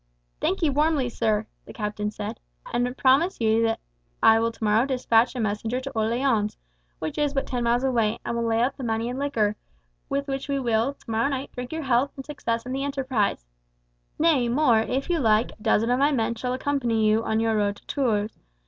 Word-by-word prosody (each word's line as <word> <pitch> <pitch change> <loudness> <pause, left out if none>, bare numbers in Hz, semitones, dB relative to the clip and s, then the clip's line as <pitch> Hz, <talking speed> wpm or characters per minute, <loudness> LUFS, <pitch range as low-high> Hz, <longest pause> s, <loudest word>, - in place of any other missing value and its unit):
"I - - -44
thank 195 - -1
you 305 - +3
warmly, 295 -2 +2
sir," 220 -2 0 0.2
the - - -11
captain 210 -1 -3
said, 210 +1 -6 0.3
"and 245 +2 0
promise 280 +8 +3
you 225 0 +3
that 225 0 +1 0.4
I 225 0 +7
will 230 0 +1
tomorrow 220 +2 +1
despatch 250 -2 +2
a - - -3
messenger 220 +3 -1
to 275 +1 -6
Orleans, 225 -1 0 0.4
which 160 - -4
is 290 -1 0
but 275 - 0
ten 245 -2 -2
miles 240 +2 +2
away, 230 -5 +1
and 235 - -2
will 235 - -1
lay 225 +1 +2
out 265 +2 -1
the 270 - -6
money 225 0 -1
in 250 +2 -4
liquor, 225 -7 0 0.5
with 280 +1 -1
which 270 +1 -4
we 280 -1 0
will, 235 +2 +1
tomorrow 225 0 -1
night, 275 0 -4
drink 250 0 -7
your 320 0 -3
health 260 +1 +1
and 270 - -8
success 230 -6 -3
in 255 - -5
the 270 +1 -2
enterprise. 260 - -1 0.7
Nay, 300 -7 +3
more, 245 -3 +4
if 260 +5 -1
you 345 -2 +1
like, 220 -2 +3
a - - -19
dozen 225 +3 +2
of 250 - +2
my 285 +2 +4
men 230 -4 0
shall 250 +2 -3
accompany 255 -5 0
you 215 +1 +3
on 220 0 0
your 225 0 +1
road 205 -1 +1
to - - -19
Tours. 220 -6 -1
235 Hz, 210 wpm, -25 LUFS, 220-270 Hz, 0.7 s, I